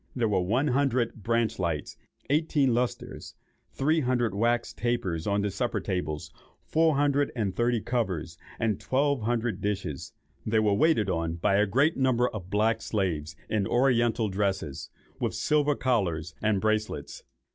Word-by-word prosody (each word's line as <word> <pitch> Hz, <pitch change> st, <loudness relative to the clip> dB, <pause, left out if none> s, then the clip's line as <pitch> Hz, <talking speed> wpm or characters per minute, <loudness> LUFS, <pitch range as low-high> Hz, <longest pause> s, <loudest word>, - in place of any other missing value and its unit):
There 120 Hz, -3 st, +1 dB
were 100 Hz, -3 st, +1 dB
one 120 Hz, +11 st, +1 dB
hundred 130 Hz, -3 st, +1 dB
branch 115 Hz, +2 st, 0 dB
lights, 80 Hz, -3 st, -2 dB, 0.4 s
eighteen 145 Hz, -4 st, +2 dB
lustres, 125 Hz, +1 st, -3 dB, 0.3 s
three 155 Hz, +4 st, +1 dB
hundred 125 Hz, -6 st, 0 dB
wax 120 Hz, +3 st, 0 dB
tapers 100 Hz, -9 st, -2 dB
on 100 Hz, 0 st, +1 dB
the 105 Hz, -, -1 dB
supper 120 Hz, +6 st, -1 dB
tables, 80 Hz, -6 st, -3 dB, 0.3 s
four 160 Hz, -1 st, +2 dB
hundred 145 Hz, 0 st, +2 dB
and 105 Hz, -6 st, -1 dB
thirty 120 Hz, -1 st, +1 dB
covers, 95 Hz, -10 st, -2 dB, 0.2 s
and 110 Hz, -4 st, 0 dB
twelve 140 Hz, 0 st, +1 dB
hundred 115 Hz, -2 st, -1 dB
dishes. 95 Hz, -8 st, -3 dB, 0.3 s
They 110 Hz, +1 st, 0 dB
were 105 Hz, -2 st, +3 dB
waited 140 Hz, -3 st, +3 dB
on 85 Hz, -3 st, -1 dB
by 90 Hz, +3 st, +2 dB
a 105 Hz, +1 st, +3 dB
great 140 Hz, -, +2 dB
number 130 Hz, -2 st, +2 dB
of 95 Hz, -4 st, -8 dB
black 110 Hz, +2 st, +1 dB
slaves 80 Hz, -7 st, -2 dB
in 105 Hz, -2 st, 0 dB
oriental 120 Hz, -2 st, +2 dB
dresses, 95 Hz, -7 st, -2 dB, 0.3 s
with -, -, -1 dB
silver 150 Hz, -1 st, +2 dB
collars 90 Hz, -12 st, 0 dB
and 105 Hz, -2 st, +2 dB
bracelets. 110 Hz, +1 st, -2 dB
110 Hz, 150 wpm, -27 LUFS, 95-125 Hz, 0.4 s, were